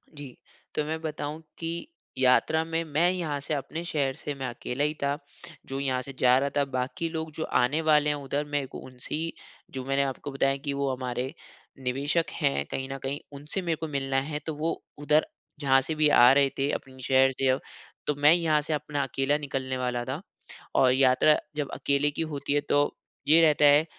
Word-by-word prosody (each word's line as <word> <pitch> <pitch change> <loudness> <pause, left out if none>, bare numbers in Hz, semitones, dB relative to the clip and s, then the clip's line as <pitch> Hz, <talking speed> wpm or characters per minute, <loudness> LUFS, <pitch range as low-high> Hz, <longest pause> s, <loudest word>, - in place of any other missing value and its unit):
जी। 145 -4 -9 0.4
तो 150 - +1
मैं 160 +1 -3
बताऊँ 155 0 -4 0.2
कि, 170 +1 -4 0.3
यात्रा 130 +5 +4
में 165 0 -2
मैं 160 +3 +2
यहाँ 165 -6 -2
से 140 +2 -3
अपने 155 +3 -4
शहर 140 -5 0
से 145 - -4
मैं 135 -1 -4
अकेला 125 +2 -3
ही 150 +1 +1
था, 140 +1 +1 0.5
जो 135 0 -4
यहाँ 130 -2 0
से 135 +2 -8
जा 125 0 +6
रहा 140 +1 +1
था, 140 - +3
बाकी 135 +5 -2
लोग 160 -1 -4
जो 160 - -3
आने 145 +4 +2
वाले 150 -2 +4
हैं 150 - +1
उधर, 145 +1 -3
मेरे 145 -1 -1
को - - -9
उनसे 125 +1 -6
ही, 165 +2 -2 0.4
जो 130 -1 -5
मैंने 135 +1 +1
आपको 135 +1 -4
बताया 135 0 +1
कि 140 0 -3
वो 140 0 -1
हमारे, 125 +1 -3 0.5
निवेशक 140 +6 0
हैं 70 +1 0
कहीं 135 0 -3
न 135 - -4
कहीं, 135 +2 -2
उनसे 150 +7 -3
मेरे 170 -2 0
को 160 +1 -5
मिलना 135 -2 -1
है, 150 +2 -3
तो 155 +2 -5
वो 160 +3 -2 0.2
उधर, 150 +1 +3 0.3
जहाँ 135 -2 +4
से 145 +4 -3
भी 155 -1 +4
आ 125 -3 +8
रहे 140 0 +4
थे 135 +1 +1
अपने 130 0 -6
शहर 130 +1 +4
से 135 - +2
अब, 130 +1 +3 0.5
तो 150 - +1
मैं 145 +2 +5
यहाँ 160 -3 +2
से 155 +1 -2
अपना 145 -1 -2
अकेला 135 +2 0
निकलने 135 -3 -3
वाला 125 -1 -1
था। 130 +5 -4 0.5
और 130 -1 +5
यात्रा 130 +3 +5 0.2
जब 145 -2 -2
अकेले 140 +1 +1
की 150 - -4
होती 145 -3 -2
है 145 - +2
तो, 145 0 +1 0.3
ये 160 +2 +7
रहता 150 -2 +5
है, 145 +2 +6
145 Hz, 210 wpm, -27 LUFS, 135-155 Hz, 0.5 s, आ